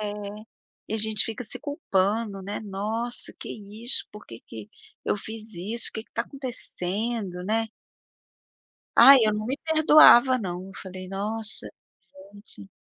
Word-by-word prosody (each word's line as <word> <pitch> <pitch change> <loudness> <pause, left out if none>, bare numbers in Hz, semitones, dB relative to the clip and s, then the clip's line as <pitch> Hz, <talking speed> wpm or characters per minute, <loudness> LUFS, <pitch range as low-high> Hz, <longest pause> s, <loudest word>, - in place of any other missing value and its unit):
É. 210 -1 -3 0.8
E - - -2
a - - 0
gente 215 -1 +1
fica 225 +2 -5
se - - -1
culpando, 210 - -1
né. 200 +2 -5
"Nossa, 215 +4 -3
que - - -8 0.3
isso, 245 +3 -1
por 210 - -12
que 115 -1 -11
que 110 -2 -9 0.4
eu - - 0
fiz 220 0 -5
isso? 215 +7 -1
Que 220 - -5
que - - -40
tá 230 - -1
acontecendo. 220 -6 -3
né?" 225 +2 0 1.3
Ai, 275 0 +10
eu 215 - +2
não 215 +1 -3
me 265 +3 -2
perdoava 310 -5 +7
não, 185 -4 -5
eu - - -12
falei: 185 -1 -8
"Nossa, 215 +2 -4 0.7
gente". 200 - -14
215 Hz, 150 wpm, -25 LUFS, 195-235 Hz, 1.3 s, Ai